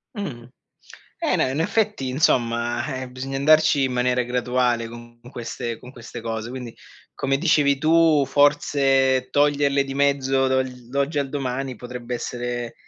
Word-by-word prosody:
Mh, 145 - -5 0.8
eh, - - +1
no, - - +1
in 140 +4 -2
effetti 205 -6 0
insomma, 120 -3 +1 0.2
eh, 130 - -6
bisogna 130 +2 -5
andarci 155 0 +4
in 130 - -1
maniera 125 0 +1
graduale 125 -1 0
con 120 0 -12
queste 115 -1 -5
con 125 +1 -13
queste 120 -1 -9
cose, 115 0 -4
quindi 125 -3 -7 0.4
come 135 0 0
dicevi 145 -4 +3
tu, 160 -1 +4
forse 135 -3 +2
toglierle 145 -1 +2
di 135 0 -6
mezzo 135 -1 +2
dall'oggi 130 +3 -1
al 140 - -1
domani 135 -2 -3
potrebbe 125 +1 -6
essere 120 0 -4
130 Hz, 140 wpm, -23 LUFS, 120-140 Hz, 0.8 s, andarci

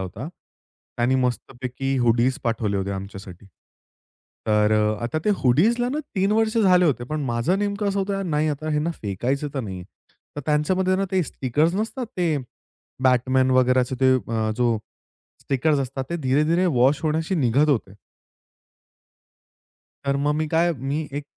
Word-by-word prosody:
होता. 95 - -6 0.7
त्याने 120 +2 +2
मस्तपैकी 125 +2 -3
हुडीज 120 +3 +2
पाठवले 110 -3 0
होते 100 0 -2
आमच्यासाठी. 95 -1 -8 1.0
तर 105 0 +3
अ, 105 0 +2
आता 120 +6 -1
ते 210 - +3
हुडीजला 215 - +2
ना 285 +4 -2 0.2
3 195 +2 +2
वर्ष 220 +1 +1
झाले 180 -4 +5
होते 135 -7 +1
पण 155 +4 -3
माझं 125 +10 0
नेमकं 205 0 -1
असं 200 0 -1
होत 195 +1 -1 0.2
नाही 155 -1 +1
आता 155 +1 -3
हेना 150 +3 0
फेकायचं 125 +9 -2
तर 135 - -1
नाही. 95 -5 -6 0.5
तर - - -3
त्यांच्यामध्ये 185 +5 +1
ना, 195 - 0
ते 185 - +3
स्टिकर्स 150 +4 0
नसतात 225 +4 -3
ते 170 -4 +1 0.7
Batman 130 +1 +3
वगैराचे 130 0 +3
ते 130 0 +5
अ, 115 -3 -1
जो 120 -2 +1 0.6
स्टिकर्स 145 +3 +1
असतात 135 0 -4
ते 170 - -1
धीरे-धीरे 150 +7 +2
वॉश 135 -1 +3
होण्याशी 160 +3 0
निघत 140 -1 +2
होते. 110 -8 0 2.1
तर 140 0 +1
मग 150 - +2
मी 155 0 -1
काय, 165 +3 +2
मी 145 +4 -3
एक 145 - -5
135 Hz, 150 wpm, -23 LUFS, 120-165 Hz, 2.1 s, झाले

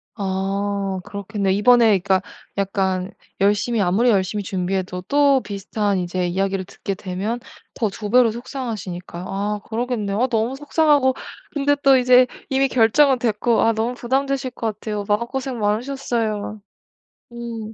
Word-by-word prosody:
아. 195 -1 -2
그렇겠네요. 200 -1 -2
이번에 235 +3 +5
그러니까 190 0 +1 0.4
약간 190 -1 -1 0.3
열심히 210 +4 +2
아무리 200 +7 +3
열심히 205 0 +1
준비해도 185 -1 -2
또 280 -2 +4
비슷한 205 -1 -2
이제 180 +1 -2
이야기를 190 +1 -1
듣게 195 +2 -5
되면 195 +6 -3 0.4
더 220 - 0
2 205 +1 -6
배로 240 0 +5
속상하시니까요. 215 -8 -6
아 205 +2 -2
그러겠네요. 220 -3 -2
아 255 - +3
너무 235 +1 0
속상하고 290 -2 +3 0.4
근데 290 0 +2
또 275 -1 +7
이제 250 0 +6 0.2
이미 270 0 +2
결정은 255 +3 +4
됐고 230 0 +1
아 230 - +3
너무 225 +3 -1
부담되실 265 +2 -1
것 220 -4 -4
같아요. 210 -2 -3
마음고생 235 +4 -1
많으셨어요. 215 -2 -2 0.7
음. 230 -2 -6
215 Hz, 330 characters per minute, -21 LUFS, 195-250 Hz, 0.7 s, 또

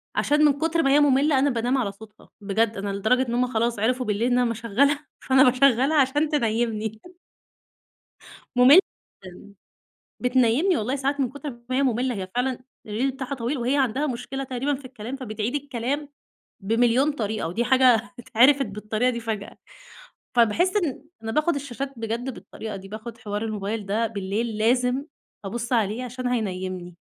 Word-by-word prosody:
عشان 300 +1 +3
من 290 - +5
كتر 325 +1 +1
ما 275 - +3
هي 290 - +6
مُملّة، 280 0 +4
أنا 285 +1 +3
بانام 245 +2 0
على 215 -6 -1
صوتها، 215 +1 -16
بجد 210 +2 0
أنا 200 +1 -3
لدرجة 220 +6 +1
إن 235 - -3
هم 250 +1 +2
خلاص 230 -1 0
عرفوا 250 +3 0
بالليل 220 +4 0
إن 245 - +3
امّا 240 -2 +2
اشغلها 275 +7 +1
فأنا 265 0 +4
باشغلها 265 +3 +3
عشان 295 +4 +1
تنيمني. 220 -4 -1 1.5
مُملّة 260 +8 +8 0.5
جدًا. 185 +2 -12 0.7
بتنيمني 255 +8 +2
والله 250 +6 -1
ساعات 280 +1 -1
من 255 -3 +1
كُتر 285 +1 -6 0.2
ما 255 - -1
هي 275 - +2
مُملّة، 250 -1 0
هي 190 -1 -4
فعلًا 250 0 0 0.3
الreel 250 +6 -1
بتاعها 270 +1 -5
طويل، 255 +3 -2
وهي 250 +4 0
عندها 270 +3 +1
مشكلة 260 +2 -4
تقريبًا 270 +2 -2
في 265 0 -11
الكلام، 245 0 -7
فبتعيد 230 0 -4
الكلام 280 +1 -3 0.5
بمليون 240 +7 +2
طريقة 215 - -3
ودي 225 +8 -1
حاجة 250 -3 +4
اتعرفت 260 +4 +4
بالطريقة 215 +4 -1
دي 235 -1 -3
فجأة 220 -3 -5 0.8
فباحس 335 - +3
إن 300 -7 -1 0.2
أنا 225 0 -4
باخد 305 +4 +2
الشاشات 275 0 -5
بجد 230 +3 -3
بالطريقة 220 -2 -8
دي، 195 0 -10
باخد 220 +2 -8
حوار 205 -1 -4
الموبايل 210 -1 -3
ده 220 +3 0
بالليل 215 +1 -3
لازم 250 +4 +2 0.4
أبص 235 +5 -4
عليه 225 +2 0
عشان 250 +1 -5
هينيمني. 185 -6 -3
245 Hz, 165 wpm, -24 LUFS, 220-270 Hz, 1.5 s, مُملّة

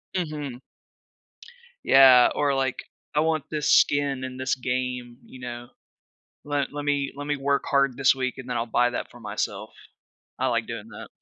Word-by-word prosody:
Mhm. 150 -7 -4 1.3
Yeah. 130 -2 +7
Or, 140 -2 +1
like, 130 -1 -1 0.3
"I 150 - +1
want 160 -1 +1
this 150 -1 -1
skin 140 -2 +3
in 130 0 -6
this 130 0 0
game," 125 -1 -3
you 130 - -14
know? 120 -1 -7 0.8
"Le 145 -1 0
let 145 0 -5
me 140 -1 0
let 145 +1 -7
me 145 - 0
work 140 0 0
hard 140 -2 +2
this 135 0 +4
week, 130 -2 -3
and 130 -1 -9
then 125 - -2
I'll 115 - -1
buy 120 +1 +2
that - - -5
for 120 - -14
myself." 105 - -4 0.7
I - - +1
like - - 0
doing - - -7
that. - - -10
135 Hz, 175 wpm, -25 LUFS, 125-145 Hz, 1.3 s, Yeah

